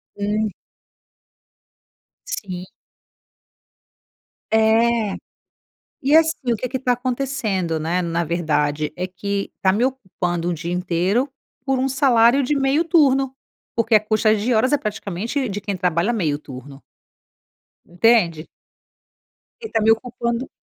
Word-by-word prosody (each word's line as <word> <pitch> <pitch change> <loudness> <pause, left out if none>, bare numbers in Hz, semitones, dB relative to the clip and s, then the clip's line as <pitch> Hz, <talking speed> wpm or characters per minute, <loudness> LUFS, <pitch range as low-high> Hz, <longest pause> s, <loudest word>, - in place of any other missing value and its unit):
hum. 210 +1 -1 1.8
Sim. 185 - -5 1.9
É. 220 0 +3 0.9
E, 280 +3 +4
assim, 315 -6 +2
o 230 - 0
que 250 +4 -4
que 260 +1 -3
tá 250 -1 +1
acontecendo, 240 -9 -2
né, 165 +4 -1
na 170 -1 -1
verdade, 155 -2 -1
é 180 +1 -2
que 200 +2 -4
tá 190 - +3
me 225 +6 +1
ocupando 180 -9 -2
um 175 - 0
dia 170 +2 -5
inteiro, 180 +8 0 0.4
por 270 -1 0
um 265 - +1
salário 260 -1 +4
de 295 - +1
meio 275 +4 +2
turno. 270 -5 +3 0.4
Porque 230 0 +1
a - - +4
custa 215 0 +2
de 220 +4 0
horas 240 +5 +2
é 290 - +4
praticamente 215 +3 -3
de 205 0 -4
quem 200 -1 -3
trabalha 180 +4 +1
meio 160 -10 0
turno. 135 -1 -11 1.1
Entende? 175 -4 +2 1.1
Ele 445 - -7
tá 225 - +1
me 220 - +5
ocupando 235 +1 -2
220 Hz, 130 wpm, -21 LUFS, 180-255 Hz, 1.9 s, me